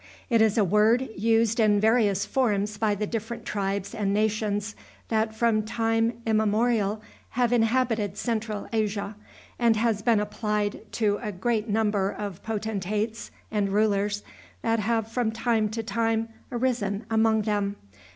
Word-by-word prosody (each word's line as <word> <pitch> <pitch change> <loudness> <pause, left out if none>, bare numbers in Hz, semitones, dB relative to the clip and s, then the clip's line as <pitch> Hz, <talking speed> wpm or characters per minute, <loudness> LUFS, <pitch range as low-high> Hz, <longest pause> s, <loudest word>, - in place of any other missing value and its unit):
It 230 -1 +4
is 220 0 +3
a 215 - +5
word 215 +7 +3
used 225 +2 +2
in 210 -2 +4
various 210 -3 +3
forms 210 -5 0
by 215 -2 +2
the 210 +1 -2
different 225 +2 -5
tribes 200 -1 -2
and 200 -2 -1
nations 210 0 0 0.3
that 220 -1 0
from 225 -1 +2
time 225 +1 0
immemorial 220 -1 +1 0.3
have 245 -1 +3
inhabited 225 -4 +1
Central 220 -3 -2
Asia, 205 -1 -1 0.4
and 235 -2 +4
has 220 -1 +1
been 230 -1 +3
applied 210 0 -2
to 210 -3 +1
a 215 -3 -3
great 215 +3 -1
number 205 -2 +1
of 200 -3 -6
potentates 215 0 -3 0.2
and 205 -2 0
rulers 205 0 +1 0.4
that 225 0 +1
have 225 +1 0
from 230 0 -1
time 225 -1 +1
to 225 +1 -4
time 225 +1 0 0.2
arisen 235 -4 -1
among 220 -1 +3
them. 205 -1 -1
215 Hz, 140 wpm, -26 LUFS, 205-225 Hz, 0.4 s, a